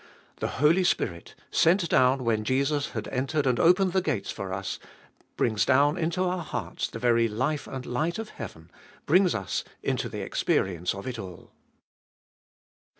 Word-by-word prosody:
The - - -2
Holy 160 +6 +4
Spirit, 90 - -1 0.2
sent 170 +2 +3
down 130 -2 +3
when 110 -2 +1
Jesus 140 +5 0
had - - -4
entered 135 +3 -1
and 125 -2 +2
opened 180 +2 +4
the 190 - +3
gates 145 - -2
for 95 -1 -6
us, 95 +1 -4 0.6
brings 110 -3 +2
down 140 +3 +4
into 175 +1 -1
our 180 0 -1
hearts - - -4
the - - -8
very 115 0 +3
life 130 +8 -2
and 130 -1 -6
light 155 +8 -1
of 225 -1 -5
heaven, 90 - -9 0.3
brings 180 +3 +4
us 100 -5 -2 0.2
into - - -1
the - - -5
experience 90 -1 0
of 100 - -8
it 125 -3 -4
all. 95 -4 -9
130 Hz, 160 wpm, -27 LUFS, 110-165 Hz, 0.6 s, Holy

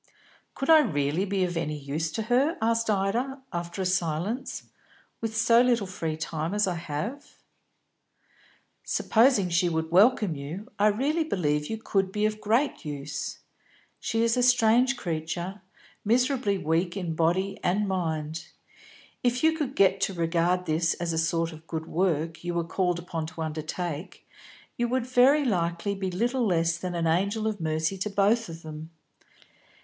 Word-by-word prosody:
"Could 270 - -3
I 320 - +9
really 155 - 0
be 195 -1 0
of 175 -1 -2
any 155 -2 -2
use 150 +3 -3
to 220 - -2
her," 255 +8 +2
asked 230 0 +1
Ida, 225 +7 0
after 170 +2 -3
a - - -3
silence, 180 - -1 0.6
"with 225 -1 -3
so 230 +1 +5
little 240 -4 +2
free 165 -4 -4
time 160 +3 -3
as 210 - +3
I 185 - -1
have?" 170 - -5 1.5
"Supposing 225 -5 +3
she 175 +1 +2
would 160 0 -2
welcome 210 0 +4
you, 165 - -7
I 210 - +5
really 280 +10 +1
believe 150 - 0
you 220 - -2
could 195 -3 0
be 210 +1 0
of 215 0 -1
great 235 +7 +1
use. 145 -2 -5 0.6
She 225 0 0
is 230 0 +2
a 250 - +2
strange 245 +1 +4
creature, 170 +2 -4 0.4
miserably 245 -2 +2
weak 170 +3 0
in 175 -4 -3
body 175 +5 0
and 200 +3 +1
mind. 160 -3 -2 0.7
If 245 +2 0
you 320 0 +4
could 285 -4 -3
get 195 0 +4
to 195 - 0
regard 170 +2 +1
this 160 0 +1
as 170 -1 -3
a - - -2
sort 165 +1 0
of 160 0 -13
good 160 -1 -4
work 165 -2 -1
you 175 0 -3
were 170 - +1
called 180 +1 0
upon 165 -2 -4
to 165 +1 -8
undertake, 160 +2 -5 0.5
you 240 - +1
would 250 0 0
very 255 +4 +4
likely 175 -2 0
be 195 -1 -3
little 240 +6 0
less 170 -2 +2
than 180 0 -4
an 170 -1 -1
angel 200 +7 +1
of 215 -4 -2
mercy 160 +4 -1
to 210 - -1
both 205 +2 +2
of 165 0 -9
them. 155 0 -8
185 Hz, 165 wpm, -27 LUFS, 165-225 Hz, 1.5 s, I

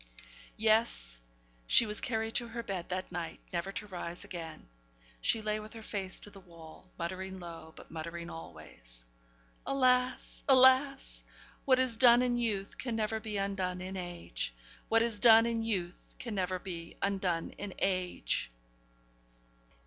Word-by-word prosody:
Yes! 215 - +2 0.5
she 235 - +7
was 210 -1 -1
carried 225 -1 -1
to 240 - +1
her 235 +1 -5
bed 190 -6 -4
that 185 0 -3
night 170 -2 -5
never 175 +3 -2
to 210 - -3
rise 175 -3 -5
again. 165 - -8 0.5
She 225 - +4
lay 215 0 0
with 215 +1 -9
her 225 -1 -9
face 195 -3 +1
to 205 - -5
the 200 - -12
wall, 170 -1 -14
muttering 190 +2 -4
low, 165 -3 -9
but - - -13
muttering 170 +1 -5
always: 70 - -10 0.6
'Alas! 255 -1 +1
alas! 265 +1 +5 0.4
what 260 -2 +5
is 255 -3 +1
done 240 0 +7
in 245 -1 +1
youth 205 -4 -2
can 240 -3 -2
never 220 0 0
be 215 -2 -4
undone 195 -2 -1
in 185 +1 -6
age! 175 - -5 0.3
What 225 0 +5
is 230 -3 -1
done 225 0 +8
in 230 -1 0
youth 190 -6 -3
can 235 -3 -5
never 185 -2 -1
be 170 -3 -7
undone 190 -4 0
in 200 -2 -6
age!' 185 - -1
195 Hz, 150 wpm, -32 LUFS, 175-225 Hz, 0.6 s, done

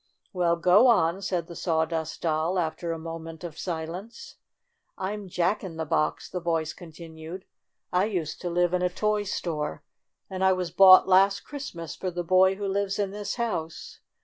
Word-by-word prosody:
"Well, 175 -2 +2
go 180 +8 +5
on," 185 -5 +3
said 180 -4 -2
the 170 - -10
Sawdust 160 -1 -2
Doll, 160 +3 0
after 170 0 -2
a 165 - -3
moment 165 0 -8
of 165 -3 -7
silence. 175 +6 -6 0.6
"I'm 200 +1 -4
Jack 180 +5 0
in 170 -4 -7
the 160 - -2
Box," 155 0 0
the 180 - -4
voice 165 -2 -1
con 175 -2 -12
tinued. 160 +2 -9 0.5
"I 180 +2 +3
used 175 -8 -3
to 175 - -3
live 175 +1 +1
in 180 - +1
a 180 - +2
toy 210 +3 0
store, 165 - -3 0.4
and 190 0 -4
I 190 0 +5
was 180 -2 -3
bought 190 +1 +8
last 195 +1 +4
Christmas 170 - -7
for 185 - -3
the 175 0 -4
boy 185 +2 +4
who 200 +1 -5
lives 195 0 -1
in 200 -2 -1
this 205 0 -4
house. 180 -9 -4
180 Hz, 180 wpm, -26 LUFS, 165-195 Hz, 0.6 s, bought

